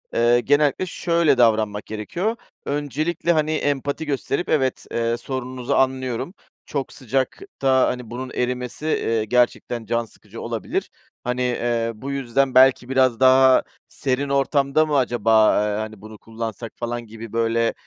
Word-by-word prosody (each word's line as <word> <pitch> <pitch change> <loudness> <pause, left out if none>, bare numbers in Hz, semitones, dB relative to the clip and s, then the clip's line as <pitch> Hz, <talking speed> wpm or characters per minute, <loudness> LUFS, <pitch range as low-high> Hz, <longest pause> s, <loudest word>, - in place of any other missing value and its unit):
ııı, 120 +1 +4
genellikle 145 +6 +2
şöyle 170 -5 +1
davranmak 110 -3 +2
gerekiyor. 170 - -3 0.3
Öncelikle, 150 +4 -1
hani, 155 -1 +1
empati 145 0 -1
gösterip, 145 +4 -2
evet, 130 -4 0
ııı, 115 0 0
sorununuzu 130 -1 -4
anlıyorum, 130 +2 0 0.3
çok 140 -3 -4
sıcakta, 135 - 0
hani, 125 -3 -4
bunun 125 +2 -6
erimesi, 125 +3 -3
eee, 115 -7 0
gerçekten 120 0 0
can 115 +1 -1
sıkıcı - - -13
olabilir. - - -3 0.3
Hani, 125 0 -1
ııı, 115 -2 -1
bu 140 +1 -4
yüzden 135 0 0
belki 130 -1 +5
biraz 130 -3 +2
daha 130 0 +6 0.3
serin 135 +1 -2
ortamda 140 +2 +2
mı 150 -2 +1
acaba, 115 -3 +3 0.2
ııı, 105 - -1
hani, 110 -2 -6
bunu 110 0 -11
kullansak 115 0 -6
falan 120 0 -4
gibi 115 0 -10
böyle 115 0 +1
125 Hz, 140 wpm, -22 LUFS, 115-140 Hz, 0.3 s, daha